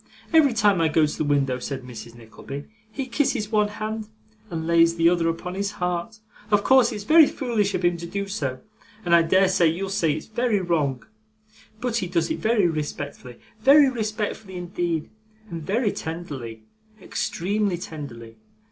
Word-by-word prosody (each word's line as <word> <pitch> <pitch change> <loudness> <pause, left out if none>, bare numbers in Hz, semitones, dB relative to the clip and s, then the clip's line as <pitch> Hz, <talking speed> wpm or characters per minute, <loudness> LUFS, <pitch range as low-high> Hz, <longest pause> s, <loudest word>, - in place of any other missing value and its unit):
'Every 300 -5 +5
time 205 -5 +3
I 165 - +4
go 155 0 +3
to 150 - -4
the - - +1
window,' 140 -3 +1
said 135 +1 -5
Mrs. 120 -1 -10
Nickleby, 120 +5 -9 0.3
'he 270 +3 -4
kisses 240 -4 -1
one 210 -1 +3
hand, 215 0 -5 0.4
and 160 -3 -4
lays 165 0 +4
the 165 0 +3
other 170 -1 +3
upon 170 +2 -4
his 200 +2 -2
heart 180 +3 -3 0.3
of 205 -1 +3
course 260 -2 +5
it's 210 -2 -5
very 315 +5 +7
foolish 225 -6 -1
of 180 - -1
him 175 0 +2
to 170 0 -7
do 200 +3 -3
so, 140 -10 -3 0.4
and 170 - +2
I 170 - +7
dare 185 +4 +4
say 180 -2 +3
you'll 180 +5 -2
say 170 -7 +1
it's 155 - -6
very 220 -1 0
wrong, 155 -8 -1 0.7
but 240 -1 -1
he 190 -5 -1
does 170 -2 0
it - - -2
very 220 -3 +2
respectfully 145 -5 -4 0.2
very 275 +2 +6
respectfully 215 -4 -4
indeed 175 -3 -2 0.4
and 165 -1 -5
very 205 +7 0
tenderly, 140 -9 -6 0.4
extremely 195 +1 -1
tenderly. 135 -9 -9
180 Hz, 175 wpm, -24 LUFS, 160-215 Hz, 0.7 s, very